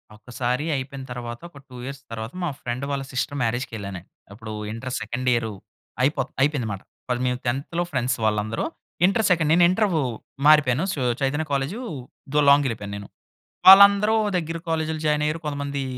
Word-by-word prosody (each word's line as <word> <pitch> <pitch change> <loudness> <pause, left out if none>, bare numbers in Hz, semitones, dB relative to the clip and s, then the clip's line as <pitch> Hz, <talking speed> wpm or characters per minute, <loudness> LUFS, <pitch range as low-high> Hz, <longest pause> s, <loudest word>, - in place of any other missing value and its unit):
ఒక్కసారి 125 +5 -3
అయిపోయిన 135 0 -5
తరవాత, 120 -1 -6
ఒక 145 - -16
2 125 - -12
ఇయర్స్ 135 0 -7
తర్వాత, 115 +2 -5
మా 175 - 0
ఫ్రెండ్ 120 +2 -4
వాళ్ళ 140 -1 -2
సిస్టర్ 135 +2 -2
మ్యారేజ్‌‌‌‌‌‌‌‌‌‌‌‌‌‌‌‌‌‌‌‌కెళ్ళానండి. 110 -6 -3 0.3
అప్పుడూ 110 +1 -9 0.2
ఇంటర్ 125 +3 -6
సెకండ్ 125 +2 -4
ఇయరూ 115 -2 0 0.5
అయిపోత్ 135 0 +1
అయిపోయిందమాట. 125 -9 0 0.3
వాళ్ళు, 125 0 0
మేము 125 0 0
10థ్‌లో 140 +8 -1
ఫ్రెండ్స్ 130 -1 0
వాళ్ళందరూ. 110 +1 0 0.4
ఇంటర్ 200 +4 +2
సెకండ్ 165 -4 +2
నేను 175 +1 +5
ఇంటరూ 185 -4 +1 0.5
మారిపోయాను. 150 -2 +5
సో, 145 - -5 0.2
'చైతన్య 145 +4 0
కాలేజు' 140 - -1 0.5
దూ 150 - +4
లాంగెళ్ళిపోయాను 115 -8 +2
నేను. 100 -1 -9 0.6
వాళ్ళందరూ 200 +3 +9 0.2
దగ్గర 165 0 -3
కాలేజ్‌‌‌‌‌‌‌‌‌లో 160 -1 -1
జాయినయ్యారు. 150 +1 +1
కొంతమందీ 140 -1 -3
135 Hz, 145 wpm, -24 LUFS, 120-155 Hz, 0.6 s, వాళ్ళందరూ